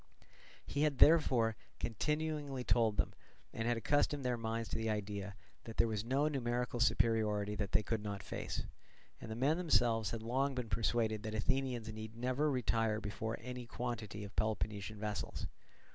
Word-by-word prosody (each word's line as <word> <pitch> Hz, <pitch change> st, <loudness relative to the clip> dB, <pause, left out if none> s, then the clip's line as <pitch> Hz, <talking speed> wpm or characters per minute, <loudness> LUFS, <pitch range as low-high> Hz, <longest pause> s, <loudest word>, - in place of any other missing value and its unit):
He 145 Hz, -, -2 dB
had 150 Hz, -3 st, +2 dB
before 125 Hz, -8 st, +6 dB, 0.2 s
continually 150 Hz, +2 st, -1 dB
told 115 Hz, -4 st, +3 dB
them, -, -, +1 dB, 0.4 s
and 115 Hz, +1 st, -2 dB
had 120 Hz, -1 st, +2 dB
accustomed 145 Hz, +2 st, +1 dB
their 125 Hz, -1 st, +2 dB
minds 115 Hz, 0 st, -2 dB
to -, -, -2 dB
the 110 Hz, 0 st, -1 dB
idea, 100 Hz, -2 st, -3 dB, 0.3 s
that 115 Hz, -, -8 dB
there -, -, +5 dB
was 110 Hz, -2 st, -1 dB
no 135 Hz, +5 st, +2 dB
numerical 125 Hz, -4 st, -1 dB
superiority 105 Hz, -3 st, +2 dB
that 100 Hz, -2 st, -3 dB
they 105 Hz, -, +4 dB
could 110 Hz, +1 st, -1 dB
not 100 Hz, -2 st, -4 dB
face; -, -, -4 dB, 0.6 s
and -, -, -8 dB
the 110 Hz, -, -3 dB
men 140 Hz, +7 st, +2 dB
themselves 120 Hz, -, +3 dB
had 115 Hz, -1 st, -4 dB
long 135 Hz, +4 st, +1 dB
been 125 Hz, -3 st, -3 dB
persuaded 110 Hz, +1 st, +1 dB
that 110 Hz, 0 st, -4 dB
Athenians 120 Hz, -1 st, 0 dB
need 110 Hz, +1 st, -7 dB
never 130 Hz, +5 st, +1 dB
retire 115 Hz, -4 st, +1 dB
before 110 Hz, +1 st, -3 dB
any 125 Hz, 0 st, -6 dB
quantity 115 Hz, -5 st, -4 dB
of 100 Hz, -, -9 dB
Peloponnesian 105 Hz, -1 st, -1 dB
vessels. 105 Hz, -1 st, -3 dB
115 Hz, 165 wpm, -36 LUFS, 110-125 Hz, 0.6 s, before